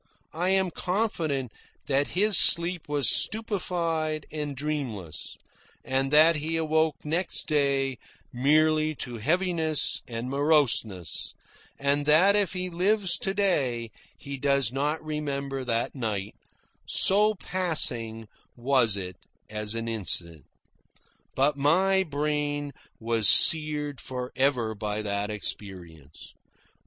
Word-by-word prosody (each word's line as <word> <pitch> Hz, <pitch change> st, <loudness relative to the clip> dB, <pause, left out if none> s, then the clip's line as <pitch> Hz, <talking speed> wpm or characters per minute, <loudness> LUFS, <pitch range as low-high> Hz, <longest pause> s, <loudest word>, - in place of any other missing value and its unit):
I 175 Hz, +4 st, -1 dB
am 190 Hz, -1 st, +2 dB
confident 165 Hz, -, -2 dB, 0.3 s
that 140 Hz, +4 st, -1 dB
his 210 Hz, +1 st, +3 dB
sleep 170 Hz, -1 st, +3 dB
was 145 Hz, -3 st, +1 dB
stupefied 170 Hz, -8 st, +1 dB
and 150 Hz, -2 st, -4 dB
dreamless, 125 Hz, -, -5 dB, 0.5 s
and 135 Hz, +1 st, 0 dB
that 155 Hz, +2 st, +5 dB
he 160 Hz, +2 st, -2 dB
awoke 160 Hz, -2 st, 0 dB
next 170 Hz, +5 st, -2 dB
day 140 Hz, -4 st, 0 dB, 0.3 s
merely 155 Hz, +4 st, +2 dB
to 125 Hz, -3 st, -6 dB
heaviness 160 Hz, -, +1 dB
and 115 Hz, 0 st, -5 dB
moroseness, 135 Hz, -, +1 dB, 0.4 s
and 140 Hz, +1 st, 0 dB
that 180 Hz, +7 st, +5 dB
if 200 Hz, -4 st, +1 dB
he 185 Hz, -1 st, -2 dB
lives 185 Hz, +2 st, +1 dB
to 195 Hz, 0 st, -2 dB
day 130 Hz, -, 0 dB, 0.3 s
he 140 Hz, -1 st, -7 dB
does 140 Hz, -3 st, +2 dB
not 150 Hz, +4 st, -2 dB
remember 140 Hz, -3 st, -4 dB
that 115 Hz, -2 st, -1 dB
night, 105 Hz, -6 st, -4 dB, 0.5 s
so 210 Hz, +2 st, +5 dB
passing 120 Hz, -, -1 dB, 0.3 s
was 120 Hz, -4 st, +1 dB
it 90 Hz, -2 st, -7 dB, 0.3 s
as 105 Hz, 0 st, -2 dB
an 115 Hz, 0 st, -4 dB
incident. 85 Hz, -, -3 dB, 0.9 s
But 140 Hz, +2 st, +1 dB
my 185 Hz, +7 st, +3 dB
brain 145 Hz, -2 st, -2 dB, 0.3 s
was 115 Hz, -1 st, +1 dB
seared 150 Hz, -3 st, +2 dB
for 125 Hz, -1 st, -6 dB
ever 130 Hz, -5 st, +1 dB
by 105 Hz, 0 st, -4 dB
that 100 Hz, 0 st, -2 dB
experience. 90 Hz, -8 st, -7 dB
145 Hz, 115 wpm, -26 LUFS, 120-160 Hz, 0.9 s, that